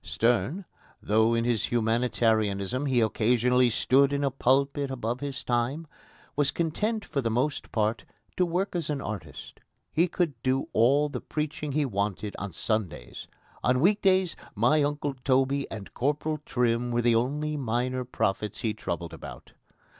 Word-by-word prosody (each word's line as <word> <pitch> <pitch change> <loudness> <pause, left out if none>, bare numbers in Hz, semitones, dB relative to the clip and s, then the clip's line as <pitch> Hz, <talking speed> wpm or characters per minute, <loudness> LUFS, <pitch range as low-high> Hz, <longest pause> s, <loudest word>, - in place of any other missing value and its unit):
Sterne, 120 - 0 0.3
though 110 +2 +2
in 115 0 +1
his 120 -4 +1
humanitarianism 115 0 +1
he 125 -3 +3
occasionally 120 +3 +3
stood 135 +4 +3
in 140 0 0
a 140 - +1
pulpit 140 +2 +1
above 120 -2 -3
his 140 -2 -5
time, 125 +6 -1 0.5
was 145 -1 +2
content 210 +7 -1
for 140 -4 -2
the 115 - 0
most 130 +6 -1
part 110 0 0 0.3
to 185 - +2
work 180 +3 -1
as 165 -4 -2
an 145 -2 -1
artist. 105 -6 -7 0.3
He 165 +4 +3
could 160 -9 -2
do 130 +1 0
all 140 +6 +4
the 145 - -5
preaching 150 -1 -3
he 150 0 +2
wanted 100 -2 -2
on 100 -1 -4
Sundays. 90 - -3 0.4
On 125 +1 +3
week 200 +8 +3
days 185 -3 +3 0.2
my 120 +8 +3
Uncle 145 0 -1
Toby 135 +1 +2
and 105 -3 -8
Corporal 150 +3 -1
Trim 120 -1 +1
were 120 0 0
the 120 0 +4
only 145 +6 0
minor 125 -1 -1
prophets 105 -4 -2
he 110 -2 0
troubled 85 -5 -5
about. - - -10
125 Hz, 155 wpm, -27 LUFS, 115-145 Hz, 0.5 s, all